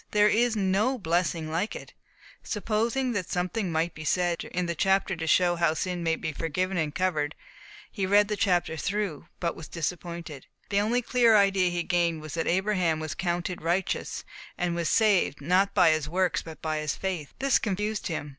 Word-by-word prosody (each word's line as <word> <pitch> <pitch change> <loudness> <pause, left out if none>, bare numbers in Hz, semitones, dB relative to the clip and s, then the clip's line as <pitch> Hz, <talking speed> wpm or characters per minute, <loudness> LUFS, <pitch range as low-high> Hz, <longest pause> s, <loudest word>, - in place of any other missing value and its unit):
There 210 0 +4
is 235 +1 +2
no 210 +6 +1
blessing 170 -4 -1
like 175 +7 -1
it." - - -9 0.5
Supposing 230 +5 -1
that 200 -6 -3
something 185 +2 -1
might 160 +1 0
be 155 - -8
said 175 +2 0
in 180 0 -2
the 170 - -1
chapter 190 +2 +1
to 160 -1 -5
show 175 +1 +3
how 170 -2 +2
sin 180 +2 -2
may 165 -1 +1
be 160 - -4
forgiven 180 +5 -2
and 155 -4 -1
covered, 155 -5 0 0.6
he 195 -4 -2
read 205 +1 +5
the 210 - -1
chapter 180 -5 +1
through, 190 -3 -2
but 170 -1 -1
was 160 - -9
disappointed. 170 -3 -5 0.2
The 200 0 +2
only 240 +4 +1
clear 235 -2 +4
idea 195 -2 +3
he 175 -1 -2
gained 170 -2 +1
was 155 - -7
that 165 -1 -2
Abraham 185 -3 +1
was 155 -1 -4
counted 175 0 -2
righteous, 175 +4 -1 0.3
and 175 -1 0
was 170 -1 -1
saved, 205 -9 +3
not 185 +7 +2
by 165 - +6
his 155 -1 -1
works, 185 +1 +1
but 160 -1 -11
by 155 -1 -1
his 155 -1 -2
faith. 180 -7 -4
This 270 0 +3
confused 210 +1 -2
him. 155 -3 -4
180 Hz, 190 wpm, -27 LUFS, 165-200 Hz, 0.6 s, by